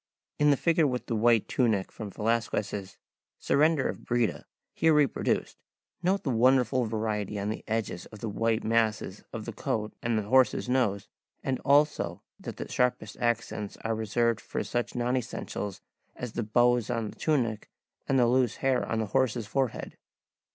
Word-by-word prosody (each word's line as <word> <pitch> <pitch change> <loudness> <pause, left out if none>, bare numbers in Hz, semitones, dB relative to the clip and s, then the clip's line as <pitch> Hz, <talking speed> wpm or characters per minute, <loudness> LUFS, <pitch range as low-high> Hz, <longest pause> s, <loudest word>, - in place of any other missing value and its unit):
In 150 0 +5
the 140 - +4
figure 165 0 +3
with 125 -2 -2
the 115 - -2
white 115 0 +3
tunic 110 -7 +1
from 110 -2 -7
Velazquez's 105 -3 -2 0.4
"Surrender 150 -1 +2
of - - -5
Breda," 120 -2 0 0.3
here 160 -1 +3
reproduced, 145 -4 +1 0.4
note 190 +3 +1
the 135 - 0
wonderful 125 +1 +3
variety 105 -2 -2
on 100 +1 -2
the 110 - -4
edges 110 -5 -2
of 110 - -12
the 110 - -5
white 110 +2 0
masses 110 -1 0
of - - -6
the - - -5
coat 105 -1 -2
and 115 -1 0
the 110 - 0
horse's 130 +4 +3
nose, 120 -6 +1 0.4
and 130 -1 -1
also 140 - +2 0.2
that - - -7
the - - -5
sharpest 125 -4 0
accents 115 -3 -1
are 115 - 0
reserved 110 +1 0
for - - -3
such 120 -1 -3
non 125 +1 0
essentials 110 -5 -4 0.3
as 125 -2 -5
the 120 - -3
bows 120 +1 +2
on 115 -2 -2
the - - -16
tunic 120 -9 0 0.4
and 135 - +3
the 125 - +5
loose 125 -1 +2
hair 135 -2 +1
on 115 - -2
the 110 - 0
horse's 125 -4 +1
forehead. 130 +2 -2
115 Hz, 170 wpm, -28 LUFS, 110-130 Hz, 0.4 s, In